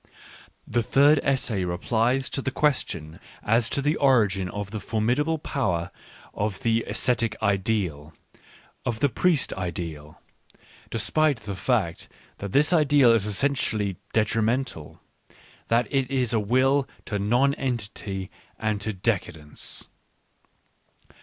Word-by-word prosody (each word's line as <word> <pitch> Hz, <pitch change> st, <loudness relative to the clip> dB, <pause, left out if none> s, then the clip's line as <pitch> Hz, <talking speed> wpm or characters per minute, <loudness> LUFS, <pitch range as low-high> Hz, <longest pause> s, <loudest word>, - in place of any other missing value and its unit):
The 120 Hz, -, 0 dB
third 140 Hz, +5 st, +4 dB
essay 125 Hz, -8 st, 0 dB
replies 115 Hz, +9 st, 0 dB
to 135 Hz, -, -2 dB
the 130 Hz, -, -1 dB
question 90 Hz, -, -1 dB, 0.2 s
as 115 Hz, +1 st, +2 dB
to 140 Hz, -, -1 dB
the 150 Hz, +2 st, +1 dB
origin 105 Hz, -9 st, +3 dB
of 105 Hz, 0 st, -5 dB
the 110 Hz, -, -4 dB
formidable 120 Hz, -, 0 dB
power 95 Hz, -, -2 dB, 0.4 s
of 100 Hz, -2 st, -3 dB
the 115 Hz, 0 st, +1 dB
ascetic 115 Hz, -3 st, 0 dB
ideal, 95 Hz, -7 st, -1 dB, 0.7 s
of 115 Hz, -2 st, -2 dB
the 145 Hz, -, +3 dB
priest 165 Hz, +5 st, +1 dB
ideal, 85 Hz, -4 st, -5 dB, 0.7 s
despite 135 Hz, +4 st, +1 dB
the 100 Hz, -1 st, -5 dB
fact 95 Hz, -4 st, -1 dB, 0.3 s
that 100 Hz, -1 st, -5 dB
this 145 Hz, -, +4 dB
ideal 145 Hz, -6 st, +5 dB
is 110 Hz, -3 st, +2 dB
essentially 105 Hz, -4 st, 0 dB
detrimental, 110 Hz, -, 0 dB, 0.7 s
that 115 Hz, 0 st, +2 dB
it 135 Hz, -2 st, +1 dB
is 125 Hz, -3 st, 0 dB
a 115 Hz, -, +3 dB
will 130 Hz, +6 st, +2 dB, 0.2 s
to 105 Hz, -, -2 dB
nonentity 110 Hz, -4 st, -1 dB, 0.3 s
and 105 Hz, -2 st, -1 dB
to 110 Hz, -, -2 dB
decadence. 90 Hz, -7 st, -3 dB
115 Hz, 120 wpm, -25 LUFS, 100-135 Hz, 0.7 s, ideal